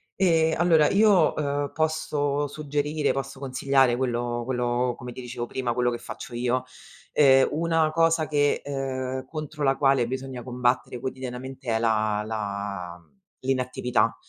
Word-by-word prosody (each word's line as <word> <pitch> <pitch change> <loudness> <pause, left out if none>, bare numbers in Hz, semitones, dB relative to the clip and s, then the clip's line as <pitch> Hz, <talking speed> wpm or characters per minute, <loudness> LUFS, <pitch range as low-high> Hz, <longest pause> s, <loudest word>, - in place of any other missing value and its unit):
Ehm, 165 -4 +3
allora 165 -3 +4
io, 200 -5 +4
ehm, 145 -1 -1
posso 145 -2 0
suggerire, 150 +1 -1
posso 135 0 -5
consigliare 135 -1 +2
quello 120 -1 -1
quello, 125 0 0
come 125 0 -8
ti 125 - -8
dicevo 120 -1 -5
prima, 125 -2 -2
quello 125 0 +1
che 120 - -3
faccio 120 +1 -8
io. 125 +1 0 0.5
Ehm, 135 -2 +6
una 165 0 +1
cosa 165 -1 +2
che, 145 -1 +1
ehm, 130 -2 -3
contro 155 +1 -6
la 135 -1 +3
quale 135 -3 +3
bisogna 130 -1 -5
combattere 125 0 -1
quotidianamente 130 +1 -6
è 110 - +1
la 110 -2 +1
la 100 -5 -4
mhmm, - - -29 0.3
l'inattività. 130 -2 0
130 Hz, 145 wpm, -25 LUFS, 120-145 Hz, 0.5 s, Ehm